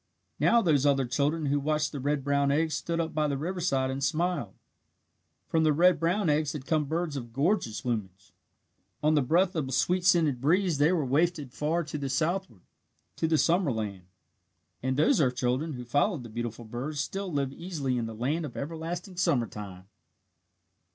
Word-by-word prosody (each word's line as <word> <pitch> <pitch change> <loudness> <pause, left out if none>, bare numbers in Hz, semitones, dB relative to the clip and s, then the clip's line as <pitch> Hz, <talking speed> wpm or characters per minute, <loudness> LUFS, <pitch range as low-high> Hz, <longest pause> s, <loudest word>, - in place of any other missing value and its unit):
Now 235 0 +4
those 150 -7 +3
other 140 -2 +3
earth 120 - -7
children 150 +4 +1
who 145 +1 +1
watched 150 +1 0
the 145 - -5
red 145 +1 -1
brown 140 0 +2
eggs 155 +2 +1
stood 170 0 -2
up 165 -1 -2
by 155 -1 +1
the 140 -1 -1
riverside 155 -5 -1
and 135 +1 -4
smiled. 165 - -1 0.9
From 160 -1 +2
the 155 -1 +4
red 180 +4 +4
brown 175 +4 +1
eggs 150 0 +1
had 145 -4 -6
come 155 -1 +1
birds 160 +1 -2
of 120 -4 -6
gorgeous 135 - 0
plumage. 100 -6 -4 0.7
On 155 +1 +4
the 150 - +4
breath 175 +8 +2
of 155 -5 -1
a - - -5
sweet 175 +8 +1
scented 160 -8 +3
breeze 170 +1 +2
they 150 +4 +4
were 165 -6 +1
wafted 145 -1 0
far 155 +5 0
to 150 -3 -4
southward 155 - -1 0.5
to 160 - 0
the 160 0 +3
summer 170 -1 +2
land. 105 -5 -4 0.8
And 130 +1 -1
those 155 +1 +4
earth 125 -3 +2
children 130 +6 -1
who 125 -2 -7
followed 145 - +1
the 115 - -9
beautiful 115 +1 -5
birds 130 +7 -5
still 195 +5 -3
live 140 -3 -1
easily 150 -6 -3
in 115 - -2
the 115 - -7
land 140 +9 -1
of 145 -6 -7
everlasting 165 +5 -5
summer 160 -10 +2
time. 95 -3 -9
150 Hz, 190 wpm, -28 LUFS, 130-165 Hz, 0.9 s, Now